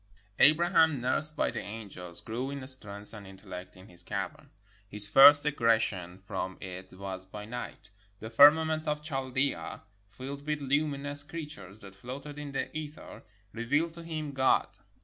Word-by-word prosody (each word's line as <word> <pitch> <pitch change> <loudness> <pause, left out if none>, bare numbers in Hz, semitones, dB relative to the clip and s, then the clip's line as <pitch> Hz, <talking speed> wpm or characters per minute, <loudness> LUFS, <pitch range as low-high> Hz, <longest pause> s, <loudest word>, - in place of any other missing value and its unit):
] 105 0 -32
Abraham, 160 -2 +2
nursed 145 +5 0
by - - 0
the - - -5
angels, 95 -5 -8
grew 120 +8 -5
in 140 -2 -7
strength 105 -6 +5
and 105 -3 -10
intellect 95 -2 -11
in 95 +1 -15
his 85 -3 -11
cavern. - - -6 0.4
His 105 0 +7
first 145 +3 +9
egression 110 -10 0
from 95 -1 -6
it 95 0 -9
was 95 0 -6
by 105 +2 -10
night. 120 -1 -9 0.3
The 110 +1 -9
firmament 155 +4 +5
of 150 0 -2
Chaldea, 135 -2 -3 0.3
filled 140 +7 -9
with 150 -1 -2
lumi 140 +1 -1
nous 145 0 -1
creatures 145 - -7
that 95 -1 -10
floated 135 +8 -9
in 145 -1 -7
the 135 - -5
ether, 155 0 -9 0.3
revealed 145 +9 -1
to 170 - -11
him 155 -3 -6
God. 130 -1 +1
130 Hz, 160 wpm, -29 LUFS, 100-150 Hz, 0.4 s, first